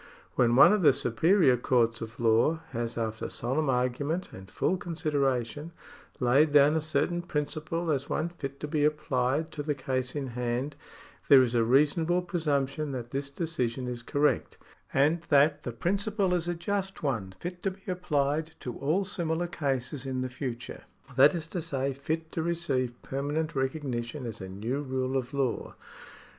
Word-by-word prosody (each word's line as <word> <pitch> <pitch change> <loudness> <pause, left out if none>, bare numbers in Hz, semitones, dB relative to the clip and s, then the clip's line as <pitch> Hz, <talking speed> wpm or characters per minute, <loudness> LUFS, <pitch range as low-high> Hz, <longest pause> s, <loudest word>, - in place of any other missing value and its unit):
When 120 -1 +3
one 135 - +8
of 210 - +2
the 145 -5 +6
superior 135 - +3
courts 115 -2 +1
of 115 +1 -7
law 120 +8 +3
has, 120 -1 -3
after 110 -1 -3
solemn 135 +5 -1
argument 130 +7 0
and 95 0 -11
full 185 - 0
consideration, 150 -3 -1 0.5
laid 135 +5 +4
down 145 +1 +6
a 160 - +1
certain 175 +3 0
principle 160 +1 -2
as 140 -1 -1
one 160 +2 -1
fit 140 -5 -7
to 150 - -3
be 150 0 0
applied 150 0 0
to 150 - -4
the 145 0 -1
case 130 -1 -2
in 140 -3 -3
hand, 125 +4 -2 0.5
there 135 -2 +8
is 120 -1 -1
a 115 -1 +3
reasonable 150 +8 +3
presumption 150 -4 -1
that 120 -2 -5
this 140 0 -3
decision 135 -6 -2
is 120 -1 -4
correct, 145 +5 0 0.3
and 150 +5 +3
that 145 +1 +4
the 120 - -4
principle 195 - 0
is 175 -1 0
a 175 - -1
just 195 +1 -3
one 110 -10 -1
fit 180 0 -6
to 195 - 0
be 190 +1 -13
applied 155 -3 0
to 125 - -5
all 160 +8 +1
similar 170 -3 -1
cases 135 -5 -2
in 130 -1 -2
the 130 - -2
future, 125 -2 -6 0.3
that. 140 +6 +6
is 165 -2 -3
to 170 +1 -4
say, 140 -4 -2
fit 160 +4 -3
to 165 - -2
receive 140 -8 -1
permanent 145 +4 -2
recognition 130 -2 -2
as 115 -4 -6
a 95 - -6
new 115 +9 -3
rule 130 -1 -2
of 130 -1 -1
law. 135 -4 -2
140 Hz, 170 wpm, -29 LUFS, 125-160 Hz, 0.5 s, one